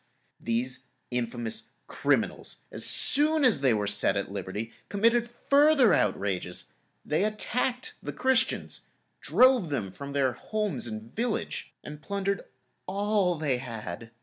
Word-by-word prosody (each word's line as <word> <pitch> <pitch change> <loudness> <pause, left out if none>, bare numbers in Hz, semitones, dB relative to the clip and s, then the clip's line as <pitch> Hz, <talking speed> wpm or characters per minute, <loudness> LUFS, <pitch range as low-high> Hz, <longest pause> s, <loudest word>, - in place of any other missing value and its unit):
These 125 +3 -2 0.2
infamous 120 -2 -2
criminals, - - -1
as - - -3
soon 300 +1 +4
as 225 - +4
they 135 -3 +4
were 105 -2 +1
set 100 -1 +3
at 100 -1 -3
liberty, 105 +3 -5 0.2
committed 230 +3 +2
further 280 0 +4
outrages; 95 -3 -1 0.3
they 155 +5 +1
attacked 240 +4 -1
the - - -5
Christians, 260 -1 0 0.3
drove 255 -9 +4
them 115 -10 -2
from 140 +7 -8
their 135 -3 +2
homes 205 - -2
and 110 +1 -8
village, 230 0 -2
and 150 0 -9
plundered 200 +1 -2 0.4
all 200 -2 +1
they 150 -5 0
had. 115 -4 -7
150 Hz, 125 wpm, -28 LUFS, -, 0.4 s, soon